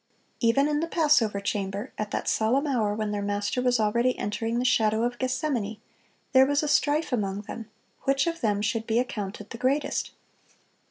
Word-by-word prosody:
Even 265 +4 +3
in 295 0 0
the 330 - -1
Passover 290 - +3
chamber, 200 +3 -3
at 210 -1 -3
that - - -3
solemn 245 +7 +2
hour 225 -8 0
when 215 -1 -2
their 205 -1 -2
Master 205 +4 -1
was 250 -1 +2
already 235 +4 +2
entering 225 +3 -2
the 245 - 0
shadow 220 -2 +3
of 245 0 -2
Gethsemane, 255 -5 -1 0.5
there 260 0 +8
was 285 +1 +1
"a - - 0
strife 295 0 +2
among 200 -3 -1
them, 220 +2 -8 0.4
which 275 0 +2
of 335 0 -3
them 205 -2 +1
should 225 0 -1
be 225 0 +1
accounted 210 -4 -3
the 230 - -7
greatest." 270 +4 0
230 Hz, 180 wpm, -26 LUFS, 210-270 Hz, 0.5 s, there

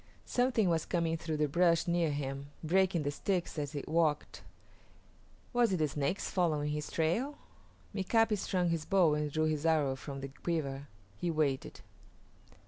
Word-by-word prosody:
Something 245 -5 +2
was 165 -2 +1
coming 165 -2 0
through 160 -1 -3
the 150 0 +2
brush 170 +2 +3
near 170 -1 +2
him, 140 -1 -3 0.2
breaking 180 0 +2
the 145 - -1
sticks 175 +1 -2
as 145 0 -4
it 145 - -4
walked. 155 -2 0 1.1
Was 240 -4 +3
it - - +2
the 155 -2 +2
Snakes 145 +6 -1
following 155 -5 +1
his 150 0 -3
trail? 225 - 0 0.6
Mika´pi 215 +3 +2
strung 180 -2 0
his 165 -2 -1
bow 175 -4 +4
and 150 0 -1
drew 155 +2 +1
his 155 -1 0
arrows 150 -5 +2
from 135 -2 -6
the 135 - -5
quiver. 140 -2 -3 0.3
He 175 - -2
waited. 150 -5 -1
160 Hz, 160 wpm, -32 LUFS, 150-180 Hz, 1.1 s, bow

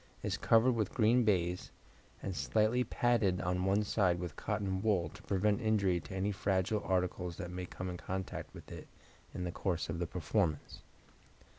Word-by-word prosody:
is - - 0
covered 115 +3 +4
with 110 -5 -1
green 120 +1 +4
baize, 90 -4 +1 0.5
and 95 - -3
slightly 110 +6 +2
padded 110 -8 +2
on 90 +1 0
one 100 +2 +3
side 95 -4 +2
with 85 -3 -5
cotton 95 -2 -2
wool, 95 -7 +2
to 105 +5 -13
prevent 100 0 +1
injury 100 -5 +2
to 95 - -9
any 95 +2 0
fragile 95 +2 0
article 90 -1 0
that 90 +1 -6
may 90 0 -5
come 95 - -6
in 90 -1 -4
contact 95 +1 -5
with - - -12
it - - -8 0.4
in 90 - -4
the 90 - -2
course 85 -2 -2
of 85 0 -3
the 85 - -1
performance. 85 -2 -1
95 Hz, 175 wpm, -34 LUFS, 90-105 Hz, 0.5 s, covered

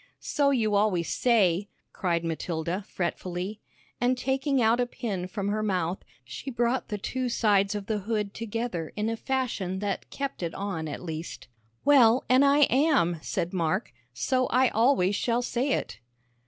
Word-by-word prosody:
"So 285 -1 +1
you 225 -6 +1
always 200 -5 +2
say," 200 -5 +2 0.2
cried 170 -3 0
Matilda, 165 +3 -2
fretfully, 185 +3 -4 0.4
and 250 +1 +2
taking 270 +2 0
out 230 +1 +3
a 245 - +1
pin 195 -7 -4
from 200 +1 -3
her 215 +1 0
mouth, 185 -4 -1 0.3
she 130 - -7
brought 240 +1 0
the 210 - -3
two 255 +5 -2
sides 205 -3 +2
of 205 -1 -4
the 215 0 -1
hood 210 0 -2
together 225 -7 -4
in 215 +1 -1
a - - -1
fashion 230 -7 -2
that 200 -1 -3
kept 275 -5 -4
it 170 -2 -3
on 190 -5 -3
at 150 - -6
least. 160 -5 -6 0.4
"Well, 255 -4 +6
an' 255 +1 +6
I 280 +1 +5
am," 265 - +3
said 170 +2 -3
Mark, 185 - -1 0.2
"so 255 - 0
I 255 0 +3
always 225 -4 +3
shall 240 +3 0
say 250 +3 -1
it." 95 - -3
210 Hz, 165 wpm, -27 LUFS, 180-245 Hz, 0.4 s, Well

